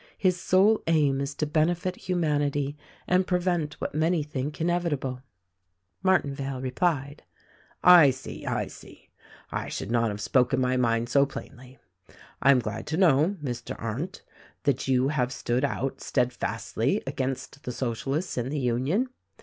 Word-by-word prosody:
His 185 Hz, -2 st, +1 dB
sole 200 Hz, +4 st, +4 dB
aim 145 Hz, -4 st, +3 dB
is 140 Hz, +1 st, -3 dB
to 150 Hz, -, -1 dB
benefit 170 Hz, +4 st, 0 dB
humanity 145 Hz, -5 st, 0 dB, 0.3 s
and 180 Hz, +1 st, +2 dB
pre 180 Hz, -, +2 dB
vent 175 Hz, -5 st, -1 dB
what -, -, -3 dB
many 160 Hz, +1 st, +1 dB
think 145 Hz, 0 st, -4 dB
inevitable." 160 Hz, -7 st, -1 dB, 0.8 s
Martinvale 140 Hz, -7 st, +1 dB
replied: 140 Hz, +2 st, -1 dB, 0.6 s
"I 175 Hz, -5 st, +9 dB
see! 130 Hz, +1 st, -6 dB
I -, -, -1 dB
see! -, -, -14 dB, 0.4 s
I -, -, -3 dB
should 105 Hz, -, -4 dB
not 115 Hz, -1 st, +2 dB
have 105 Hz, 0 st, -5 dB
spoken 125 Hz, +4 st, +2 dB
my 130 Hz, 0 st, +1 dB
mind 115 Hz, -2 st, +1 dB
so 140 Hz, +2 st, +4 dB
plainly. 130 Hz, -1 st, -10 dB, 0.6 s
I 135 Hz, -, +4 dB
am 140 Hz, -, +7 dB
glad 110 Hz, -2 st, -4 dB
to 155 Hz, -, -1 dB
know, 175 Hz, +1 st, +4 dB
Mr. 125 Hz, -3 st, -4 dB
Arndt, 135 Hz, -, -4 dB, 0.4 s
that 140 Hz, -2 st, 0 dB
you 130 Hz, 0 st, +3 dB
have 130 Hz, -4 st, 0 dB
stood 125 Hz, -1 st, -1 dB
out 135 Hz, -1 st, -2 dB
steadfastly 125 Hz, 0 st, -1 dB
against 135 Hz, +1 st, -4 dB
the 125 Hz, -, -5 dB
Socialists 135 Hz, -, -2 dB
in 120 Hz, +2 st, -2 dB
the 150 Hz, -, -2 dB
Union. 130 Hz, -, +1 dB
140 Hz, 150 wpm, -27 LUFS, 130-165 Hz, 0.8 s, I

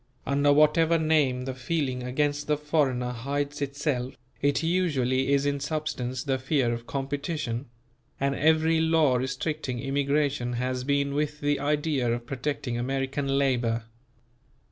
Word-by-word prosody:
Under 145 Hz, +1 st, +3 dB
whatever 155 Hz, +3 st, +4 dB
name 150 Hz, -6 st, +2 dB
the 130 Hz, -, -3 dB
feeling 130 Hz, -1 st, -2 dB
against 145 Hz, +3 st, -1 dB
the 150 Hz, -1 st, +2 dB
foreigner 140 Hz, -5 st, 0 dB
hides 140 Hz, +4 st, -3 dB
itself, 140 Hz, -2 st, -2 dB, 0.3 s
it 145 Hz, +1 st, +2 dB
usually 140 Hz, -7 st, +1 dB
is 140 Hz, 0 st, +3 dB
in 140 Hz, 0 st, 0 dB
substance 140 Hz, -4 st, -3 dB
the 135 Hz, -2 st, 0 dB
fear 130 Hz, -3 st, +1 dB
of 115 Hz, 0 st, -6 dB
competition; 140 Hz, -2 st, -3 dB, 0.5 s
and 140 Hz, 0 st, +1 dB
every 160 Hz, +2 st, +3 dB
law 160 Hz, -5 st, +3 dB
restricting 130 Hz, 0 st, -3 dB
immigration 140 Hz, -1 st, 0 dB
has 125 Hz, +1 st, -2 dB
been 140 Hz, +1 st, +1 dB
with 150 Hz, 0 st, -1 dB
the 145 Hz, -1 st, +1 dB
idea 145 Hz, -3 st, 0 dB
of 120 Hz, 0 st, -3 dB
protecting 130 Hz, -1 st, -3 dB
American 135 Hz, +2 st, -1 dB
labour. 120 Hz, -4 st, +1 dB
140 Hz, 135 wpm, -27 LUFS, 130-150 Hz, 0.5 s, whatever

